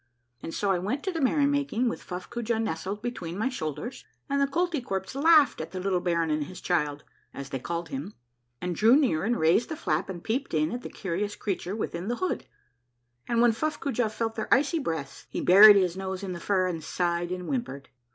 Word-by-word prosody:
" 120 0 -45
And - - -6
so 200 +3 0
I 185 - +1
went 215 +11 -2
to 380 - -1
the 330 -3 -3
merry 280 +2 +3
making 280 -4 +1
with 230 - -3
Fuffcoojah 225 +5 -3
nestled 200 +1 -3
between 185 -8 -4
my 220 +5 0
shoulders, 160 - -5 0.2
and 280 0 0
the 280 - +3
Koltykwerps 275 - -2
laughed 290 - +5
at 160 - -7
the 185 - -3
little 185 -1 0
baron 170 -2 0
and 150 -1 0
his 180 +3 -10
child, 150 -5 -1 0.3
as 140 0 -7
they 135 -2 -3
called 170 +4 -4
him, 150 +9 -6 0.4
and 180 +3 -3
drew 225 +7 +6
near 255 - +2
and 235 +3 +1
raised 165 +9 +3
the 315 - -3
flap 160 - -1
and 175 -3 -6
peeped 255 - -2
in 155 0 +1
at 240 +1 -4
the - - -7
curious 200 +2 -3
crea 195 -3 -2
ture 185 +4 -5
within 185 -4 -4
the 240 - 0
hood, 370 +8 -2 0.8
and 235 0 +2
when 240 - +6
F 225 - -8
uffcoojah 280 -7 0
felt 225 +1 -2
their 220 -1 -5
icy 295 +5 +3
breaths, 160 - -5
he - - -4
buried 205 +3 +9
his 185 -3 +2
nose 190 0 -4
in 190 -2 -3
the 175 - -6
fur 185 +1 +1
and 170 -3 -3
sighed 175 +1 -1
and 180 0 -4
whimpered. 235 - -4
195 Hz, 220 wpm, -27 LUFS, 170-245 Hz, 0.8 s, buried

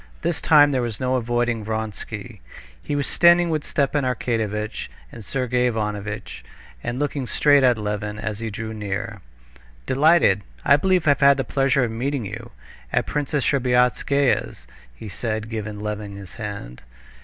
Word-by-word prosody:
This - - -1
time 145 -2 +6
there 130 -2 +1
was 115 -3 -4
no 130 0 0
avoiding 120 -2 0
Vronsky. 110 0 -5 0.4
He 145 - -3
was 140 -1 0
standing 170 0 +4
with 155 -2 -1
Stepan 140 0 0
Arkadyevitch 110 -4 -2 0.2
and 115 - -10
Sergey 125 +2 0
Ivanovitch, 105 -2 -4 0.4
and 120 - -3
looking 140 -2 -2
straight 145 +2 +4
at 125 -3 +4
Levin 105 0 -3
as 105 -1 -4
he 115 -1 -3
drew 110 +1 -5
near. 105 0 -4 0.6
"Delighted! 140 - +4 0.2
I 140 - +7
believe 180 +1 +1
I've 140 -2 +4
had 140 0 +6
the 135 - 0
pleasure 135 +1 +1
of 120 - -1
meeting 125 +2 -2
you... 110 +4 -7 0.4
at - - +1
Princess 145 -1 -1
Shtcherbatskaya's," 125 - +1 0.3
he 110 - -9
said, 110 +2 -4
giving 105 -2 -4
Levin 105 -1 -5
his 95 -2 -10
hand. 100 - -7
120 Hz, 155 wpm, -23 LUFS, 105-140 Hz, 0.6 s, I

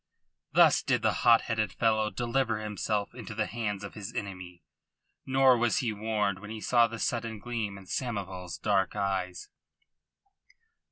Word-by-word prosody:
Thus - - +6
did - - 0
the - - +3
hot 115 -1 +6
headed 110 -4 -1
fellow 110 +1 +1
deliver 120 0 0
himself 105 0 -2
into 115 -4 -8
the 110 -1 0
hands 105 -4 -3
of 100 - -7
his 105 +1 -7
enemy. 90 -4 -6 0.6
Nor 130 -1 +5
was 120 0 +2
he 115 -4 0
warned 105 -2 -1
when 105 +1 -10
he 110 0 -6
saw 120 +2 +4
the 115 0 -7
sudden 115 -1 -2
gleam 105 -2 -4
in 95 - -12
Samoval's 95 -7 -4
dark 100 -2 +1
eyes. 95 -3 -2
105 Hz, 155 wpm, -29 LUFS, 100-115 Hz, 0.6 s, Thus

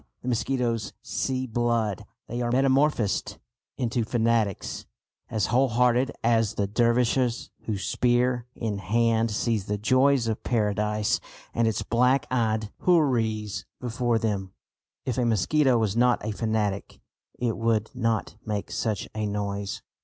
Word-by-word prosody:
The 125 - -2
mosquitoes 120 -1 -1
"see 130 -1 -2
blood." 115 -4 0 0.2
They 120 +1 -3
are 120 0 0
metamorphosed 135 -3 +2 0.4
into 120 -1 0
fanatics 115 -3 0 0.4
as 110 -3 0
wholehearted 125 0 +3
as 115 -2 +2
the 100 - +1
Dervishes 120 +3 +1
who, 110 -3 -1
spear 120 +4 +1
in 105 -4 -3
hand, 115 +4 +2
see 110 +1 0
the 105 +1 -3
joys 130 +3 +3
of 110 -1 -2
Paradise 105 -2 0 0.3
and 115 0 +2
its 110 -1 0
black 125 +5 +2
eyed 110 -4 0
houris 115 - +1
before 120 -1 0
them. 100 -4 -2 0.5
If 130 -1 -1
a 125 - +2
mosquito 120 - +3
was 110 -3 0
not 120 -2 +3
a 110 - -1
fanatic, 105 -2 -2 0.4
it 120 -2 -1
would 115 -1 0
not 115 -4 -1
make 105 -2 -3
such 105 -5 -2
a 110 -1 -2
noise. 100 -1 -3
115 Hz, 130 wpm, -26 LUFS, 105-125 Hz, 0.5 s, wholehearted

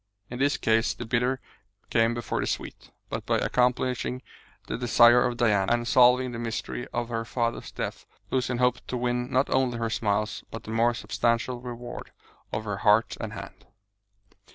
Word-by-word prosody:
In 125 - -5
this 145 +2 +2
case 115 0 +2
the 120 - -6
bitter 125 +3 +1 0.5
came 115 +1 +3
before 120 -4 -3
the - - -2
sweet. - - -5 0.2
But - - -3
by - - +2
accomplishing 125 0 0 0.4
the - - -3
desire 120 0 +6
of 120 -1 -1
Diana, 105 -5 +2
and 120 0 +1
solving 125 0 +5
the 115 - -5
mystery 120 +1 -4
of 120 0 -2
her 115 -1 -2
father's 115 0 -2
death, - - -5 0.2
Lucian 125 -1 0
hoped 125 0 +1
to 125 - -2
win 125 0 -1
not 130 +1 +2
only 130 -2 +2
her 115 -1 -2
smiles 105 -1 -1
but 115 - -8
the 110 - -7
more 115 +1 +2
substantial 120 +2 -1
reward 120 -1 -7 0.4
of 110 - -2
her 105 -2 -3
heart 105 +2 +3
and - - -5
hand. - - -10
120 Hz, 175 wpm, -27 LUFS, 115-125 Hz, 0.5 s, desire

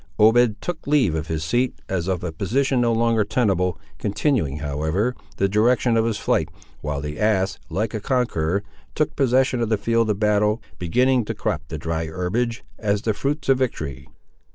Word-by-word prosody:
Obed 110 0 +5
took 175 -5 -5
leave 140 - +3
of 80 0 -3
his 80 -1 -2
seat, 120 +10 +1
as 90 -2 -2
of 95 -3 -1
a 90 - -2
position 125 - +1
no 120 -1 +3
longer 115 -1 +2
tenable, 95 -6 +1 0.2
continuing, 105 - 0
however, 80 - -1 0.2
the 100 - +2
direction 115 +4 +3
of 115 0 +3
his 115 -2 0
flight, - - 0 0.3
while 75 -1 -3
the 75 +1 -5
ass, 100 -2 +1
like 110 +2 -2
a 110 - -2
conqueror, 100 - 0 0.3
took 155 - 0
possession 130 -2 +2
of 115 - 0
the 110 - +2
field 115 +2 +1
of 105 - +1
battle, 105 +1 +2 0.2
beginning 125 +8 +2
to - - -4
crop 75 - -2
the 80 - -5
dry 80 +1 -2
herbage, 105 +8 -2 0.2
as 105 -1 0
the 110 - +1
fruits 140 +7 -2
of 135 -1 +4
victory. 70 - -3
105 Hz, 180 wpm, -23 LUFS, 85-120 Hz, 0.3 s, Obed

